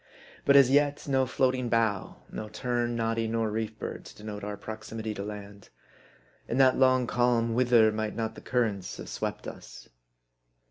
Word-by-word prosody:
But 140 Hz, -, +5 dB
as 135 Hz, -2 st, +7 dB
yet, 145 Hz, +1 st, +2 dB
no 135 Hz, -2 st, +2 dB
floating 125 Hz, -1 st, +1 dB
bough, 110 Hz, -4 st, 0 dB
no 110 Hz, -, -6 dB
tern, 120 Hz, +2 st, -1 dB
noddy, 115 Hz, 0 st, 0 dB
nor 110 Hz, -1 st, 0 dB
reef 110 Hz, 0 st, -3 dB
bird, -, -, -6 dB
to -, -, -12 dB
denote 105 Hz, -1 st, -7 dB
our 105 Hz, 0 st, -4 dB
proximity 110 Hz, 0 st, -6 dB
to 100 Hz, -, -5 dB
land. 100 Hz, -1 st, -9 dB, 0.8 s
In -, -, -2 dB
that 130 Hz, -1 st, +6 dB
long 130 Hz, -1 st, +4 dB
calm, 120 Hz, -1 st, +1 dB
whither 120 Hz, -2 st, +5 dB
might 110 Hz, 0 st, -3 dB
not 110 Hz, -1 st, -2 dB
the -, -, -11 dB
cur 125 Hz, -1 st, +1 dB
rents 100 Hz, -5 st, -4 dB
have -, -, -8 dB
swept -, -, -4 dB
us -, -, -10 dB
115 Hz, 175 wpm, -28 LUFS, 110-125 Hz, 0.8 s, as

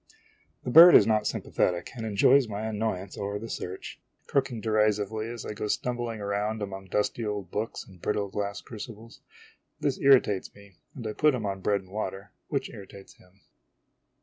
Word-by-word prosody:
The 125 Hz, -, -3 dB
bird 170 Hz, +5 st, +10 dB
is -, -, +8 dB
not 110 Hz, -1 st, +2 dB
sympathetic, 90 Hz, -1 st, -1 dB
and 115 Hz, -2 st, -4 dB
enjoys 115 Hz, +5 st, +4 dB
my 105 Hz, -1 st, -5 dB
annoyance 105 Hz, -3 st, -3 dB
over 100 Hz, +1 st, -3 dB
the 115 Hz, +2 st, -7 dB
search; 90 Hz, +1 st, -6 dB, 0.2 s
croaking 135 Hz, -4 st, 0 dB
derisively 110 Hz, 0 st, 0 dB
as 120 Hz, -1 st, -7 dB
I -, -, -4 dB
go 105 Hz, 0 st, -4 dB
stumbling 120 Hz, 0 st, -2 dB
around 105 Hz, +1 st, -2 dB
among 95 Hz, -1 st, -6 dB
dusty 105 Hz, +4 st, -1 dB
old 105 Hz, -4 st, -4 dB
books 110 Hz, +2 st, -4 dB
and 90 Hz, -3 st, -17 dB
brittle 105 Hz, -1 st, -1 dB
glass 100 Hz, 0 st, -3 dB
crucibles. 115 Hz, 0 st, -10 dB, 0.6 s
This 140 Hz, -3 st, -1 dB
irritates 130 Hz, -8 st, +3 dB
me; 100 Hz, -1 st, -16 dB, 0.2 s
and 120 Hz, -, -8 dB
I 110 Hz, -, -3 dB
put 150 Hz, +1 st, +3 dB
him 115 Hz, -4 st, -4 dB
on 95 Hz, -1 st, -3 dB
bread 100 Hz, 0 st, +1 dB
and 95 Hz, -1 st, -19 dB
water, 95 Hz, -2 st, -5 dB, 0.2 s
which -, -, -2 dB
irritates 100 Hz, 0 st, -12 dB
him. 90 Hz, +2 st, -24 dB
105 Hz, 175 wpm, -27 LUFS, 100-115 Hz, 0.6 s, bird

